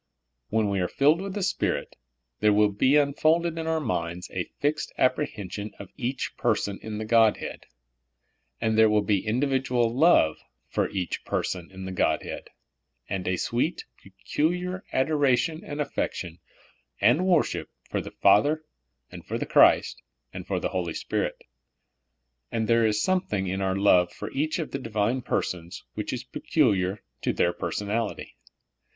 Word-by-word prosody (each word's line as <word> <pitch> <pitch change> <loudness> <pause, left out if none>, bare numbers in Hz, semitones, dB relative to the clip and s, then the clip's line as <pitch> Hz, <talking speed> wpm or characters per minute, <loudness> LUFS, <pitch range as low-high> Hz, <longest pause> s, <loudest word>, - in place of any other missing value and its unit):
When 110 -1 +1
we 100 -1 0
are 90 - +1
filled 150 - +3
with 195 0 -5
the 205 - -2
Spirit, - - -1 0.4
there 105 - +4
will 105 0 +4
be 130 +8 +3
unfolded 160 +3 +2
in 160 - -3
our 160 0 +1
minds 90 - -3
a 90 -2 -3
fixed 150 +1 -1
apprehen 130 -7 0
sion 105 +1 -6
of 100 - -10
each 125 +3 -3
person 105 -4 0
in 110 -1 -5
the 110 - -4
Godhead; 115 -1 +2 0.9
and 110 -1 +1
there 110 0 +6
will 105 -1 +3
be 100 -2 +1
individual 125 -1 +1
love 140 - +4 0.3
for - - -1
each 95 -3 -3
person 90 -2 -3
in 95 0 -9
the 95 - -5
Godhead, 95 - -1 0.6
and 95 -1 -3
a 90 - +1
sweet, 125 - -1 0.2
peculiar 180 - -2
adoration 145 +2 +1
and 145 0 -6
affection 90 - -3 0.6
and 175 - +4
wor 175 -4 +5
ship - - -5 0.2
for - - -2
the - - -8
Father 150 +9 +3 0.5
and - - -9
for - - -3
Christ, - - +4 0.3
and - - -7
for - - -1
the - - -2
Holy 85 -3 -3
Spirit. - - -2 1.1
And 110 -1 -1
there 115 -1 +4
is 105 -1 +1
something 180 - 0
in 95 +1 -2
our 95 -1 0
love 90 -3 +4
for - - -7
each 155 +3 -1
of 160 - -4
the 135 - -3
Divine 115 +1 -1
persons 90 -4 -3
which 105 - -4
is 125 -1 -4
peculiar 105 - 0 0.2
to - - 0
their 85 - +2
per 85 - -4
sonality. 105 +4 -2
115 Hz, 160 wpm, -26 LUFS, 100-145 Hz, 1.1 s, there